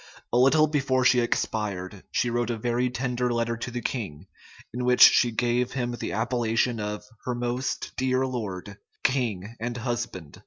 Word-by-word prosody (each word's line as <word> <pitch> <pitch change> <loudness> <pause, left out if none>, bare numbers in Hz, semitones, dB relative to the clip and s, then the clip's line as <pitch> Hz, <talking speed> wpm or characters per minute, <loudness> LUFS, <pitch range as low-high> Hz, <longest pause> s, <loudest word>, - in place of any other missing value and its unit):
A - - +4
little 145 +4 +5
before 135 -4 +1
she 125 0 +5
expired, 105 -5 -2
she 120 - 0
wrote 120 0 0
a 120 - -1
very 120 +2 0
tender 125 0 -1
letter 115 0 0
to 120 - -5
the 120 -1 -5
king, 95 - -4 0.5
in 125 +1 -3
which 125 0 +2
she 120 - +8
gave 120 +2 0
him 125 -2 -1
the 120 - -4
appellation 115 +1 0
of 105 0 -4 0.2
"her 125 - -1
most 120 +2 -2
dear 130 0 +1
lord, 105 -5 -5 0.2
king, 115 -5 0
and 120 +1 -3
husband." 115 - -4
120 Hz, 165 wpm, -26 LUFS, 110-125 Hz, 0.5 s, she